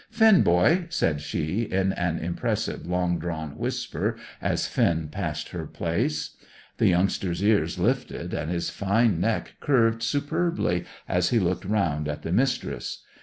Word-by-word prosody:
"Finn, 220 -3 +6
boy!" 120 - +4
said 80 - 0
she, 80 +6 -2
in 95 -3 0
an 85 -2 -1
impressive, 85 0 -2
long 90 -1 0
drawn 80 -3 -4
whisper, - - -2 0.3
as - - 0
Finn 80 -2 +1
passed - - -4
her - - -5
place. 110 - -1 0.5
The - - +4
youngster's 90 0 +1
ears 105 0 +2
lifted, - - -1
and 80 - -2
his 85 -1 -2
fine 100 -1 +2
neck 115 +3 -1
curved 115 -5 +2
superbly 145 - 0 0.2
as 90 0 +2
he 120 - +2
looked 90 -2 0
round 85 -8 0
at 75 -1 -4
the 80 - -3
Mistress. 125 +6 -1
90 Hz, 145 wpm, -26 LUFS, 85-115 Hz, 0.5 s, Finn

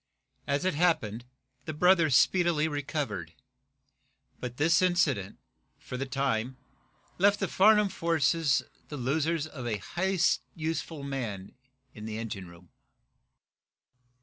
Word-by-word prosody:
As 140 +5 0
it 185 - +2
happened, 125 -9 0 0.4
the 155 - -5
brother 175 -1 +4
speedily 165 +2 +3
recovered, 140 - -4 1.1
but 125 0 -6
this 160 +3 +3
incident 165 - +1 0.4
for - - -8
the 135 +2 -3
time 130 -2 -1 0.6
left 200 +2 +4
the 195 - 0
Farnum 210 +3 +5
forces 165 -4 +1 0.2
the 150 - -7
losers 150 +5 0
of 135 -6 -7
a 110 -3 -1
highly 190 - -2 0.4
useful 160 -2 -4
man 115 -9 -5 0.4
in 105 -1 -9
the 110 -1 -5
engine 105 -5 -5
room. 85 0 -16
145 Hz, 120 wpm, -29 LUFS, 120-170 Hz, 1.1 s, Farnum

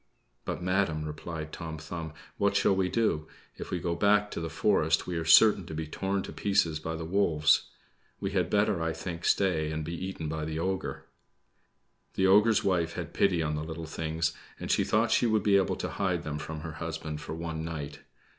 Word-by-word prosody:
"But, - - -4
madam," 90 -4 0
replied 80 +1 -6
Tom 80 -2 -6
Thumb, 80 0 -6 0.2
"what 100 0 +2
shall 100 - +3
we 95 -1 +1
do? 100 -10 0 0.3
If - - -7
we 90 - -2
go 85 0 -1
back 105 +4 +3
to - - -4
the 80 - -3
forest - - +2
we 90 - -4
are 80 -1 -2
certain 100 +5 +7
to 80 - -6
be 80 0 -3
torn 95 +5 -2
to - - -8
pieces 95 -6 +1
by 80 +1 -4
the 80 0 -5
wolves. 80 -4 +3 0.5
We 100 - -2
had 90 -3 0
better, 105 -3 +2
I 80 0 0
think, 85 +1 -6
stay 80 -6 +2
and 80 0 -3
be 85 - -4
eaten 90 -2 -4
by 80 0 -3
the 80 0 -4
ogre." 95 +3 -3 1.1
The 95 - +2
ogre's 105 +3 +5
wife 85 -3 +1
had - - -6
pity 90 -4 +2
on 75 -1 -1
the 75 - -3
little 80 +1 -6
things, 80 +1 -2 0.3
and - - -3
she - - +3
thought 110 +1 +2
she 120 - +4
would 110 -3 +2
be 100 -1 +5
able 95 - +1
to - - -4
hide 90 -4 -1
them 75 -1 -4
from 80 0 -6
her 80 - -5
husband 80 -2 -4
for 80 - -6
one 80 -1 -4
night. 75 -3 -5
85 Hz, 210 wpm, -29 LUFS, 80-95 Hz, 1.1 s, certain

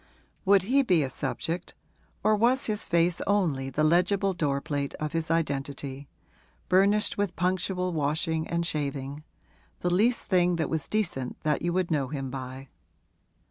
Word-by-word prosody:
Would 195 -1 +5
he 265 +8 +3
be 180 - +3
a 130 - -3
subject, 170 +6 -4 0.5
or 215 +1 +4
was 245 +5 +2
his 215 -1 0
face 170 0 +2
only 165 -10 +1
the 150 +3 0
legible 185 +5 +3
door 145 -5 0
plate 145 -2 -3
of 155 -1 -4
his 165 -1 -2
identity, 140 -3 -2 0.6
burnished 200 +3 +3
with 200 -3 0
punctual 180 0 0
washing 160 +1 0
and 170 0 -1
shaving 140 -2 -3 0.6
the 175 0 +1
least 230 +7 +2
thing 180 -2 +3
that 165 -2 -2
was 160 -3 -1
decent 170 -12 -2
that 150 -1 +1
you 175 - 0
would 185 -1 0
know 140 -4 +1
him 135 -2 -4
by? 130 0 -7
165 Hz, 155 wpm, -27 LUFS, 145-185 Hz, 0.6 s, Would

